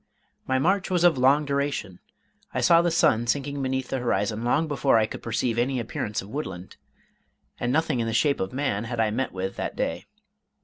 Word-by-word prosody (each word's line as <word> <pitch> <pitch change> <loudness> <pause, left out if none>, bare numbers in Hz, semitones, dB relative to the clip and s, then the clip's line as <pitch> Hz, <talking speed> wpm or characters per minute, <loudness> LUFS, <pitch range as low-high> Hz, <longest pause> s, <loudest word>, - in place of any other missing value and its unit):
My 130 - +2
march 180 +7 +1
was 180 -2 +1
of 170 -7 +4
long 140 +4 +4
duration; 140 -10 -2 0.6
I - - +1
saw 170 0 +6
the 175 - +1
sun 120 -8 +2
sinking 140 +3 -1
beneath 130 0 -2
the 135 - -1
horizon 110 -2 -1
long 145 +7 +1
before 140 -4 +2
I 110 - +3
could - - -8
perceive 115 0 -1
any 130 +1 0
appearance 105 -3 -3
of 100 - -12
woodland, 95 -10 -6 0.8
and 120 - -1
nothing 155 -2 +1
in 115 - -1
the - - -1
shape 140 +5 +2
of 95 - -2
man 125 -6 -1
had 120 0 -4
I 110 -1 +2
met 130 +4 -2
with 95 +1 -4
that - - -3
day. 85 +1 -3
130 Hz, 205 wpm, -25 LUFS, 110-145 Hz, 0.8 s, saw